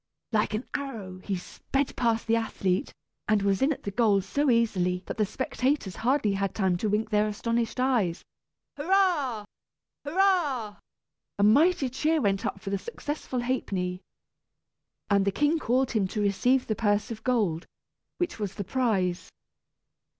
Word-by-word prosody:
like 215 Hz, -1 st, +1 dB
an 220 Hz, -, -3 dB
arrow 215 Hz, -10 st, -5 dB
he 195 Hz, +1 st, -3 dB
sped 270 Hz, +9 st, -3 dB
past 230 Hz, -2 st, +1 dB
the 230 Hz, -, +2 dB
athlete, 195 Hz, -4 st, -1 dB, 0.4 s
and 215 Hz, -2 st, +2 dB
was 195 Hz, -1 st, +1 dB
in 275 Hz, +3 st, +3 dB
at 290 Hz, -, -4 dB
the 200 Hz, -, -3 dB
goal 210 Hz, -2 st, +3 dB
so 280 Hz, +9 st, 0 dB
easily 185 Hz, -6 st, +1 dB
that -, -, -5 dB
the 215 Hz, -2 st, +1 dB
spectators 255 Hz, -, -1 dB
hardly 245 Hz, -4 st, +1 dB
had 195 Hz, -1 st, -2 dB
time 190 Hz, -4 st, +2 dB
to 210 Hz, +5 st, -1 dB
wink 215 Hz, +2 st, 0 dB
their 210 Hz, 0 st, +3 dB
astonished 230 Hz, +3 st, -1 dB
eyes! 235 Hz, -10 st, +1 dB, 0.5 s
Hurrah! 300 Hz, -, +1 dB, 0.6 s
hurrah! 290 Hz, -, +1 dB, 0.6 s
A 200 Hz, -, +2 dB
mighty 285 Hz, -, +4 dB
cheer 305 Hz, +6 st, +1 dB
went 200 Hz, -2 st, +1 dB
up -, -, -4 dB
for 195 Hz, -, -6 dB
the 200 Hz, -, 0 dB
successful 295 Hz, -, -4 dB
Ha'penny, 190 Hz, -8 st, -2 dB, 1.1 s
and 200 Hz, -1 st, +4 dB
the 200 Hz, -, +1 dB
king 295 Hz, +9 st, +2 dB
called 255 Hz, 0 st, +1 dB
him 210 Hz, -5 st, +1 dB
to 210 Hz, -, -4 dB
receive 245 Hz, +6 st, +2 dB
the 215 Hz, -, -1 dB
purse 205 Hz, 0 st, +1 dB
of 220 Hz, -1 st, -7 dB
gold, 205 Hz, -10 st, 0 dB, 0.5 s
which 350 Hz, -9 st, -2 dB
was 205 Hz, -2 st, -3 dB
the 200 Hz, -, -3 dB
prize. 195 Hz, -6 st, 0 dB
220 Hz, 155 wpm, -27 LUFS, 200-265 Hz, 1.1 s, mighty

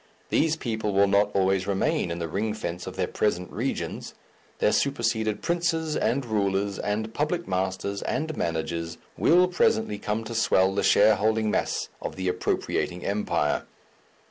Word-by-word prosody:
These 160 Hz, 0 st, +2 dB
people 110 Hz, -7 st, -2 dB
will 100 Hz, +1 st, +5 dB
not 100 Hz, +1 st, +3 dB
always 95 Hz, -1 st, +2 dB
remain 95 Hz, -3 st, 0 dB
in 85 Hz, -, -3 dB
the 85 Hz, -1 st, -3 dB
ring 105 Hz, +6 st, -2 dB
fence 90 Hz, -4 st, -5 dB
of -, -, -6 dB
their -, -, 0 dB
present 90 Hz, -4 st, -1 dB
regions; -, -, -3 dB, 0.4 s
their -, -, +3 dB
superseded 115 Hz, -5 st, 0 dB
princes, 165 Hz, -2 st, 0 dB
and 135 Hz, -1 st, 0 dB
rulers, 100 Hz, -2 st, 0 dB
and 110 Hz, +2 st, -2 dB
public 165 Hz, +6 st, -1 dB
masters, 95 Hz, +2 st, -2 dB
and 155 Hz, 0 st, -2 dB
managers, 85 Hz, 0 st, -2 dB, 0.2 s
will 180 Hz, +2 st, +5 dB
presently 110 Hz, -, +1 dB
come 105 Hz, +2 st, -2 dB
to 115 Hz, +1 st, -6 dB
swell 95 Hz, -4 st, +3 dB
the 100 Hz, -, 0 dB
shareholding 110 Hz, +1 st, +4 dB
mass -, -, -1 dB
of -, -, -5 dB
the 95 Hz, 0 st, -3 dB
appropriating 90 Hz, 0 st, -1 dB
Empire. 100 Hz, -7 st, 0 dB
105 Hz, 150 wpm, -26 LUFS, 95-115 Hz, 0.4 s, will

